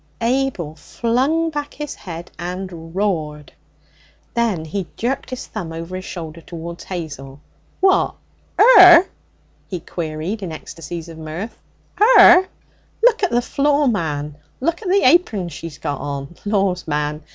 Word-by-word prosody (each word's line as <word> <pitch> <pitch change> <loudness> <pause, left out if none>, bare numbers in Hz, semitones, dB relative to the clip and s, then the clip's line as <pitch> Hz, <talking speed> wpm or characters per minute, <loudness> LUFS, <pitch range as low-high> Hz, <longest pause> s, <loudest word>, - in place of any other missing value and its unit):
Abel 240 - 0
flung 260 - 0
back 295 -1 -5
his 295 -1 -5
head 170 -2 -9
and 175 -2 -6
roared. 155 -7 -2 0.8
Then 225 -9 0
he 180 +2 -4
jerked 250 +4 -2
his 255 -1 -6
thumb 180 -7 -6
over 165 +2 -6
his 185 0 -6
shoulder 165 -2 -7
towards 170 +1 -8
Hazel. 145 -6 -7 0.4
'What? 380 0 +3 0.4
'er?' 370 -6 +9 0.6
he 180 - -4
queried 165 +5 -4
in 185 -4 -5
ecstasies 165 +1 -8
of 165 -1 -10
mirth. 160 +8 -6 0.4
''Er? 380 -5 +8 0.6
Look 480 -2 +5
at 380 - +2
the 240 +1 +1
floor, 285 +2 +2
man! 150 - -2 0.2
Look 335 +7 -1
at 395 - -4
the 395 +2 +3
apern 240 - +3
she's 165 0 -8
got 145 - -4
on! 140 +2 -5
Laws, 195 -4 0
man! 150 0 -2
185 Hz, 140 wpm, -20 LUFS, 160-270 Hz, 0.8 s, er